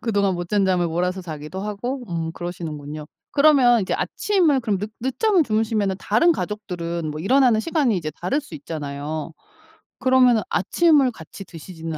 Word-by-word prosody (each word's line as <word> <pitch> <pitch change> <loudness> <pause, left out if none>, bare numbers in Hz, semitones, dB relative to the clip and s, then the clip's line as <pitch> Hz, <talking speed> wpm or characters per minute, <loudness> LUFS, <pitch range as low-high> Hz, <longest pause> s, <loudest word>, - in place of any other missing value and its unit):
그동안 200 -4 +1
못 175 0 -5
잔 205 -2 +2
잠을 180 -2 +2
몰아서 180 +3 -1
자기도 155 +2 -7
하고 225 +6 -4
음 165 -2 -3
그러시는군요. 155 -4 -6 0.2
그러면 275 -6 +5
이제 185 - -1
아침을 340 -10 +1
그럼 210 -4 -1
늦 210 +3 -5
늦잠을 320 - +2
주무시면은 215 -4 0
다른 280 +12 +3
가족들은 170 - -4
뭐 150 - -6
일어나는 245 +2 +4
시간이 290 - +1
이제 155 -3 -3
다를 185 +12 0
수 275 - -13
있잖아요. 150 +1 -5 0.7
그러면은 255 -3 +4
아침을 285 - +3
같이 190 +1 -11
드시지는 165 -1 -8
195 Hz, 385 characters per minute, -22 LUFS, 165-250 Hz, 0.7 s, 그러면